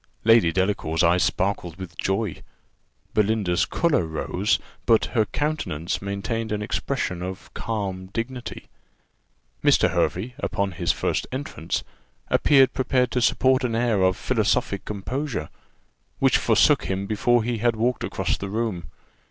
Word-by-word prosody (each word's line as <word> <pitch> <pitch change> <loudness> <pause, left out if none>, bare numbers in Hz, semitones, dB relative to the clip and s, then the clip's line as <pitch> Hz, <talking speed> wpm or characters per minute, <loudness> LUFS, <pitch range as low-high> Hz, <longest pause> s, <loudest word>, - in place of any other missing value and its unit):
Lady 115 -6 +5
Delacour's 90 -3 0
eyes 85 +2 +4
sparkled 90 -3 0
with 90 -2 -9
joy. 95 -2 -2 0.7
Belinda's 105 -4 +2
colour 165 - +1
rose, 90 +6 0 0.3
but 115 -2 +5
her 110 -3 +3
countenance 145 - -2
maintained 105 +3 -3
an 105 0 -1
expression 90 -3 -2
of 95 +1 -7
calm 95 -4 -3
dignity. 115 +5 -5 1.0
Mr. - - +4
Hervey, 110 +8 0
upon 100 -7 -1
his 85 -1 0
first - - -1
entrance, 130 - -3 0.5
appeared 135 -3 +4
prepared 125 -1 +1
to 125 - 0
support 130 +2 +3
an 120 -2 0
air 115 -4 +1
of 95 0 +3
philosophic 100 -1 0
composure, 110 - -3 0.7
which - - +3
forsook - - +4
him 95 +1 -2
before 115 +3 +2
he 120 0 -2
had 120 +1 +2
walked 120 0 0
across - - -1
the 100 - -4
room. 105 -5 -2
105 Hz, 135 wpm, -24 LUFS, 95-120 Hz, 1.0 s, Lady